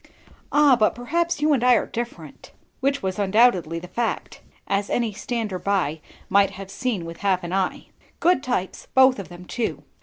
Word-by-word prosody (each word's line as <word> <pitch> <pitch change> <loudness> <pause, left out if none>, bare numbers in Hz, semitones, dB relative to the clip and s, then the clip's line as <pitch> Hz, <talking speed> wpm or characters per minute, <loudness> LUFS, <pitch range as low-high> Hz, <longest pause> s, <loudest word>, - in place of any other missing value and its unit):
"Ah, 290 -3 +6
but 215 -3 +2
perhaps 335 +7 -1
you 305 0 +4
and 255 -4 +1
I 250 0 +6
are - - +1
different." 235 +1 -7 0.3
Which 275 +1 0
was 190 +1 -2
undoubtedly 195 -5 +3
the 175 +2 -7
fact, 230 +6 -3 0.2
as 200 0 -1
any 230 -3 0
stander 215 -3 -3
by 180 -7 -1 0.3
might 200 0 +4
have 195 0 -9
seen 235 -9 -2
with 165 0 -8
half 190 -2 0
an 175 +1 -5
eye. 190 -1 -1 0.3
Good 355 -4 +3
types 215 -9 -3
both 260 -2 +6
of 195 - -7
them, 175 0 -11
too. 230 +4 -3
210 Hz, 180 wpm, -23 LUFS, 185-250 Hz, 0.3 s, Ah